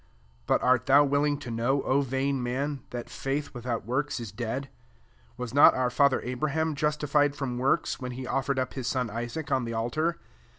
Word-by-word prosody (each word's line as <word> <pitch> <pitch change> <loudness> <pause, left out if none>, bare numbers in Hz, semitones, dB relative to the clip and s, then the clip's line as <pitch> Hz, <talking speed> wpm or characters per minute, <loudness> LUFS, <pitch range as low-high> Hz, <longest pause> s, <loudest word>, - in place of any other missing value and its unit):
SO 65 -3 -34 0.2
But - - +2
art 130 -1 +3
thou 140 +2 +7
willing 145 +1 +1
to 125 - -7
know, 120 +5 0
O 135 +2 +2
vain 135 0 -1
man, 135 +3 -2
that 120 -1 -6
faith 140 +2 -3
without 120 -3 -4
works 135 +4 -1
is 115 -4 -6
dead? 120 +5 -3 0.7
21 - - -31
Was 125 -2 -5
not 145 - +7
our 125 -1 +1
&ther 140 +1 +3
Abraham 155 +5 -1
justified 150 -1 +1
from 125 -4 -3
works, 135 +6 +1
when 125 -2 -5
he 130 +1 -6
offered 135 +1 -1
up 130 -1 -1
his 130 -3 -4
son 125 -4 -1
Isaac 120 +7 -5
on 130 -2 +2
the 115 0 -4
altar? 155 +9 -1
135 Hz, 200 wpm, -28 LUFS, 120-145 Hz, 0.7 s, thou